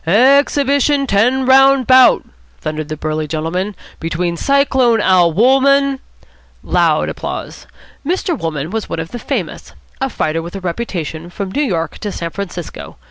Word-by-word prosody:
"Ex 260 - +4
hib 285 -2 0
it 280 0 +2
i - - +3
on 275 -1 -1
ten 250 +4 +2
round 270 0 +5
bout," 255 +1 +5 0.3
thundered 155 - -4
the 155 - -4
burly 155 0 -3
gentleman, 165 +6 -3 0.2
"between 170 +1 -2
Cyclone. 265 -1 +2
Al. 185 -4 +4
Wolmann 270 - +3 0.3
" - - -33 0.2
Loud - - +2
applause. - - -6 0.4
Mr. 350 +3 -1
Wolmann 160 - -4
was 225 -1 -4
one - - -3
of 160 0 -6
the 240 - -6
famous, - - -5 0.3
a 270 - 0
fighter 160 -8 -2
with 170 +3 -9
a - - -4
reputation 175 -4 -5
from 195 +1 -5
New 290 - -1
York 175 - -2
to 210 - -4
San 170 -3 -5
Francisco. 180 -3 -7
200 Hz, 170 wpm, -16 LUFS, 165-270 Hz, 0.4 s, round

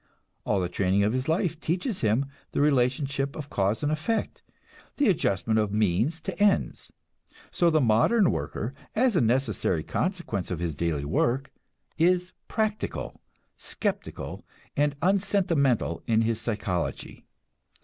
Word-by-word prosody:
All 105 - +1
the 90 - 0
training 95 +2 +1
of 105 +2 +1
his 130 +1 -1
life 165 0 0
teaches 180 - -2
him 115 +5 +2 0.3
the - - 0
relationship 140 0 +1
of 150 -2 -7
cause 100 +6 0
and 145 - +1
effect, 160 +9 -2 0.6
the 285 - +3
adjustment 110 - +1
of 105 -2 0
means 110 - +1
to 190 0 -5
ends. 205 -1 +1 0.6
So 175 - +3
the 155 -2 +3
modern 130 - +4
worker, 115 +5 -3 0.2
as 245 -1 +3
a 170 - +4
necessary 115 - +1
consequence 175 - -2
of 90 - -2
his 85 -2 -3
daily 75 -2 -1
work, 120 - 0 0.5
is 180 +2 +2
practical, 215 -1 -2 0.4
skeptical, - - -4 0.3
and 145 0 +1
unsentimental 175 - +2
in 115 -1 +3
his 115 0 -1
psychology. 105 -7 -3
135 Hz, 135 wpm, -27 LUFS, 105-175 Hz, 0.6 s, modern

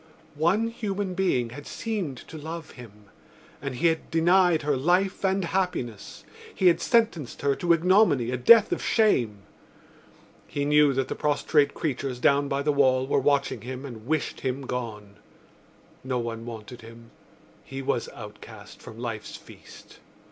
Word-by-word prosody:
One 175 +10 +1
human 205 -4 -3
being 150 -11 0
had 145 +4 -10
seemed 195 - -4
to - - -11
love 160 +1 -7
him 105 -4 -14 0.6
and 140 -2 -4
he 125 - -2
had 160 -1 +1
denied 175 0 +3
her 145 -1 +1
life 180 +9 +1
and 190 -1 +1
happiness: 165 - -3 0.3
he 190 - -1
had 170 - +1
sentenced 220 - 0
her 140 -1 +2
to 175 - 0
ignominy, 170 - +3
a - - 0
death 220 - +6
of - - -1
shame. 120 - +1 1.0
He 145 0 -3
knew 150 0 +5
that 135 0 -1
the - - -3
prostrate 145 0 +1
creatures 135 -4 -3
down 140 +3 +3
by 140 0 -1
the 150 0 +1
wall 130 -2 +3
were 135 - +1
watching 140 -1 +1
him 130 +2 -7
and 115 -4 -10
wished 155 0 -1
him 130 +1 -3
gone. 105 -5 -6 0.9
No 130 -1 -2
one 115 -1 -5
wanted 115 +1 -9
him; 115 0 -14 0.5
he 135 0 -7
was - - -1
outcast - - -12
from 110 - -11
life's 115 -3 -5
feast. - - -15
140 Hz, 155 wpm, -26 LUFS, 125-175 Hz, 1.0 s, death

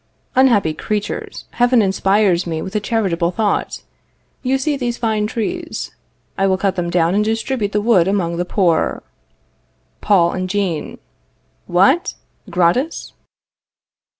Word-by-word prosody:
Unhappy 230 -11 +3
creatures, 210 +6 -4
Heaven 245 0 +3
inspires 195 -2 +2
me 160 -1 -2
with 190 +2 -7
a - - +3
charitable 190 -6 0
thought. 205 +2 -1 0.6
You 265 +1 +1
see 290 +2 -1
these 245 -3 -3
fine 220 -2 0
trees. 325 +10 -4 0.5
I 195 - +3
will 190 -1 +2
cut 190 0 0
them 175 -2 -2
down 170 0 +2
and 210 +2 +2
distribute 225 0 -1
the 210 - 0
wood 205 -6 +3
among 175 -4 0
the 175 - 0
poor. 180 -3 +1 1.0
Paul 175 -4 +3
and 185 0 -3
Jean. 185 -5 -2 0.7
What! 200 - +3 0.3
gratis? 190 - 0
200 Hz, 130 wpm, -18 LUFS, 180-230 Hz, 1.0 s, Unhappy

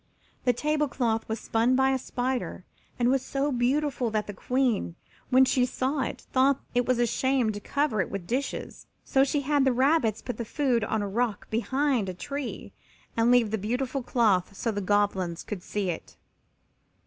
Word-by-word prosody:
The 250 - +5
table 300 +4 0
cloth 230 -5 -1
was 220 0 -2
spun 230 +4 +2
by 265 +1 +3
a 265 - +1
spider 255 0 -3 0.3
and 245 0 +2
was 265 -1 +1
so 275 +2 -1
beautiful 255 0 +1
that 215 -1 -1
the 205 - -6
Queen, 245 -4 0 0.3
when 260 +1 +6
she 255 -1 +2
saw 260 +3 -1
it, - - -3
thought 270 +1 +4
it 245 0 +1
was 255 -1 +2
a 240 - +3
shame 260 -1 +1
to 205 - -6
cover 280 -1 0
it 170 - -3
with 195 -3 -5
dishes, 255 +8 -4 0.2
so 270 - +3
she 285 +1 0
had 285 0 +2
the 265 - +4
rabbits 255 -3 +2
put 245 -4 -5
the 235 - -3
food 245 -1 0
on 220 -1 -1
a - - -2
rock 220 +1 -1
behind 255 -1 +1
a 185 - -5
tree 280 +7 -5 0.4
and 230 +1 +3
leave 245 -4 +4
the 220 - -1
beautiful 250 +6 -2
cloth 210 -7 +1
so 230 - -1
the 205 -1 -3
Goblins 190 -3 0
could 205 -4 -6
see 195 -1 -2
it. 165 - -9
245 Hz, 190 wpm, -27 LUFS, 215-270 Hz, 0.4 s, when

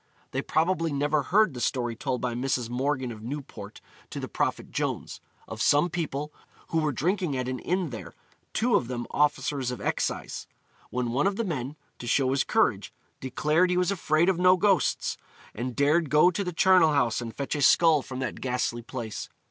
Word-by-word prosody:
They - - -1
probably 165 0 +1
never 145 +1 +1
heard 195 +4 +3
the 125 - -6
story 120 -2 -1
told 125 +1 -3
by 125 -1 -1
Mrs. 125 -1 -1
Morgan 130 0 -1
of 110 -2 -9
Newport 135 +5 -7 0.3
to - - -6
the - - -4
Prophet - - -2
Jones: - - -3 0.3
of - - -6
some 150 +4 +3
people 150 -3 -3 0.4
who 165 - +1
were 155 -1 +1
drinking 170 - -1
at 130 -1 -2
an 130 -1 -3
inn 180 -4 -1
there, 95 -7 -8 0.4
'two 240 +1 +1
of 165 -12 +3
them 120 -1 -4
officers 145 -2 +1
of 125 -3 -4
excise,' - - -2 0.4
when 125 -1 -2
one 140 +9 +2
of 200 - 0
the 230 - -1
men, 145 -5 -3 0.2
to 120 - -7
show 130 +2 +2
his 135 0 +2
courage, 115 - +1 0.3
declared 150 +7 +1
he 180 - +1
was 180 +1 +2
afraid 165 -3 +2
of 190 -2 +2
no 180 +1 +6
ghosts, 195 -1 +1 0.4
and 120 +2 -4
dared 150 +2 +2
go 155 +4 +5
to 200 +3 -2
the 180 - -3
charnel 180 -2 +5
house 120 -5 +1
and 115 -1 -7
fetch 140 - -3
a 145 - -2
skull 160 +1 +5
from 130 0 -8
that 130 - -4
ghastly 125 -2 -1
place. 115 -2 -6
145 Hz, 195 wpm, -27 LUFS, 125-170 Hz, 0.4 s, no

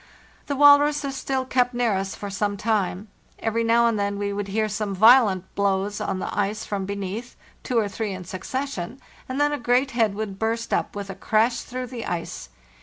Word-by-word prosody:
The 285 - -1
walruses 290 0 +5
still 265 -1 -2
kept 250 -1 +1
near 240 -3 +2
us 195 0 -2
for 205 -1 -6
some 205 +1 -1
time. 205 -1 -1 0.3
Every 230 +1 -1
now 230 +1 +4
and 230 -3 +1
then 200 0 -1
we 200 0 -2
would 200 0 -3
hear 215 +2 0
some 205 -1 -3
violent 210 -3 +5
blows 200 0 0
on - - -2
the - - -4
ice 210 +2 -1
from 195 -2 -3
beneath, 200 +4 -5 0.3
two 250 - -2
or 215 -2 +2
three 210 +1 -3
in 185 -1 -6
succession, 225 +4 -5 0.3
and 260 +2 -3
then 290 0 +3
a 290 - -2
great 250 +3 +2
head 225 -4 +1
would 200 -2 -5
burst 230 +1 -1
up - - -1
with 200 -1 -5
a - - -6
crash 220 +4 +1
through 255 0 -5
the 240 -2 -6
ice. 170 -1 -4
215 Hz, 200 wpm, -24 LUFS, 200-245 Hz, 0.3 s, walruses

